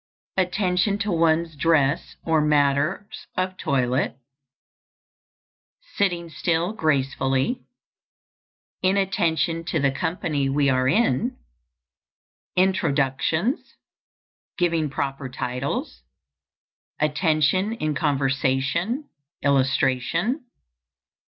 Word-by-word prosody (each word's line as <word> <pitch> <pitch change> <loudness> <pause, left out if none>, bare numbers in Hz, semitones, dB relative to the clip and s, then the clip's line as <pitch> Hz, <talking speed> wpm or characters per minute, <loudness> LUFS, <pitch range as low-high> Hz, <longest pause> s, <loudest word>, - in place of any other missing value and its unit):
_ - - +6
Attention 185 +2 0
to 205 0 -2
one's 165 -1 +2
dress 145 -2 +1
or 160 -2 +3
matters 150 +7 +1
of 185 0 -1
toilet. 130 -5 0 1.8
Sitting 175 -4 0
still 170 +3 -1
gracefully. 135 - 0 1.2
Inattention 170 -4 +1
to 165 -1 -1
the 140 -1 +2
company 150 -1 -1
we 140 +1 +2
are 130 0 +2
in. 145 - +1 1.2
Introductions. 170 - +1 0.8
Giving 165 -3 +1
proper 135 -1 -3
titles. 125 - -3 1.0
_Attention 155 +7 +1
in 155 0 0
conversation, 140 - 0 0.4
illustration. 140 - +1
155 Hz, 75 wpm, -24 LUFS, 135-180 Hz, 1.8 s, _